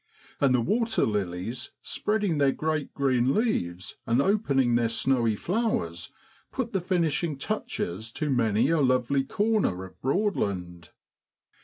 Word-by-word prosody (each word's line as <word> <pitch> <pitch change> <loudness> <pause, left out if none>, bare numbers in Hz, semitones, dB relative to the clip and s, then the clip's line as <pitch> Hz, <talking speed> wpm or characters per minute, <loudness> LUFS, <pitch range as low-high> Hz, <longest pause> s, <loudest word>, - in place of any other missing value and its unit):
And 135 -2 +4
the 125 - +2
waterlilies, 115 - -1
spreading 205 -7 0
their 140 -1 +4
great 155 0 -2
green 130 -2 +2
leaves, 95 - -1
and 115 +2 +3
opening 140 - +2
their 120 -1 +2
snowy 115 -2 +1
flowers, 165 - -2 0.4
put 235 -4 -3
the 190 - +1
finishing 170 -4 0
touches 115 - -3
to 150 -2 -2
many 120 +2 +2
a 165 -2 +3
lovely 130 +1 +2
corner 205 - 0
of 95 - -16
Broadland. 100 - -1
135 Hz, 125 wpm, -27 LUFS, 110-185 Hz, 0.4 s, And